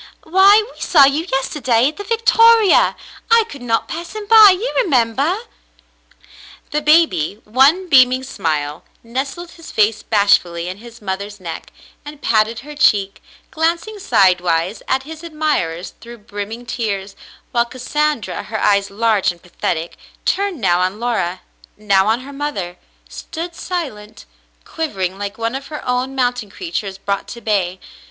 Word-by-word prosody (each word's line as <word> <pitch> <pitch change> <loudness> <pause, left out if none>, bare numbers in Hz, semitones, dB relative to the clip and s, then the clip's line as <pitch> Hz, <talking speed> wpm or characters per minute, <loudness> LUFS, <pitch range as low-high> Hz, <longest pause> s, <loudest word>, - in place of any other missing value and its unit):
*'Why, 390 +5 +5
we - - -16
saw 290 -5 +6
you 295 +5 0
yesterday 260 -3 +1
at 310 - -12
the 405 - -6
Victoria. 460 +1 +4 0.3
I 460 0 +5
could 285 - -11
not 230 -2 -1
pass 335 +1 -7
him 425 -1 -5
by, 435 -1 +9
you 390 +6 0
remember?" 280 - +1 1.3
The 300 0 0
baby, 300 - +3
one 275 - +3
beaming 255 -3 +5
smile, 155 - -3 0.2
nestled 275 +9 -5
his 330 -1 -13
face 215 0 +2
bashfully 180 -5 +2
in 185 +1 -5
his 235 0 -14
mother's 200 +1 -5
neck 170 -3 -8 0.3
and 295 0 -10
patted 225 -2 +1
her 300 +2 -10
cheek, 200 -8 +2 0.3
glancing 335 +7 -1
side 190 - +3
wise 175 +3 -1
at 265 0 0
his 320 +3 -10
admirers 305 - -2
through 235 0 -11
brimming 210 +3 -7
tears, 200 -5 -4 0.4
while 235 -1 +2
Cas 250 +1 -11
sandra, 300 -4 -1
her 220 -1 -5
eyes 200 -1 +2
large 215 -2 +1
and 175 - -15
pathetic, 170 -1 -4 0.3
turned 395 -5 0
now 175 -5 +2
on 185 +3 -1
Laura, 190 -7 -2 0.4
now 200 -2 +2
on 225 +3 +1
her 280 +2 -10
mother, 205 -12 -4 0.3
stood 340 +1 -7
silent, 275 - -6 0.4
quivering 195 - -3
like 205 +1 -5
one 230 +1 -2
of 270 +1 -6
her 300 -4 -8
own 250 +2 -1
mountain 245 -4 -1
creatures 205 - -5
brought 200 0 -3
to 235 - -8
bay. 190 -5 -1
240 Hz, 150 wpm, -18 LUFS, 200-315 Hz, 1.3 s, by